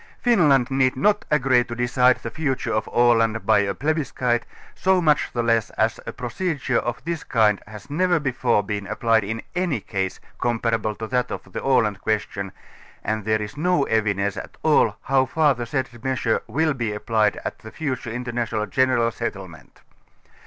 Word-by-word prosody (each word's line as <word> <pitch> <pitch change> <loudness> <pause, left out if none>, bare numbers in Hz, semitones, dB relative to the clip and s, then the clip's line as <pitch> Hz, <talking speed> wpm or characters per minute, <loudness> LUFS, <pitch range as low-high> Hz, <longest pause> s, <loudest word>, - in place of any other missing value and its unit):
Finland 150 - +3
need 130 -1 +2
not 205 +10 +2
agree 130 -4 +3
to 120 -1 -7
decide 125 +1 +3
the - - -4
future 135 -6 -2
of. 110 - -1
Aland 115 -2 +3
by 110 -2 +5
a 100 -1 0
plebiscite, 130 - -1 0.3
so 190 0 +2
much 155 -4 +2
the 120 - -1
less, 115 -2 +2
as 110 +1 +1
a - - -2
procedure 130 0 -2
of 120 +4 -4
this 165 -3 -3
kind 110 -5 +2
has 105 +3 -11
never 175 +4 +1
befors 125 -6 +1
been 100 -1 -4
applied 110 +1 +2
in 110 +3 -4
any 175 -8 0
case, 95 -1 -3 0.2
comparable 115 -2 0
to 110 - -5
that 125 +2 0
of - - -7
the - - -4
Aland 115 -7 +2
question 100 -3 -2 0.5
and 110 -1 -2
there 110 -1 +1
is 105 - -8
no 175 -1 +2
evidence 100 -4 0
at - - -8
all - - +4
how 130 0 +2
far 150 +1 +3
the 120 -2 -5
said 130 +1 -1 0.2
measure 130 -4 0
will 155 +7 +1
be 120 -5 -2
applied 105 0 +1
at - - -4
the 110 - -10
future 130 -4 -4
interna 120 0 -3
tional 105 -1 -2
general 130 -3 +2
settlement. 95 -8 -7
120 Hz, 175 wpm, -23 LUFS, 110-135 Hz, 0.5 s, by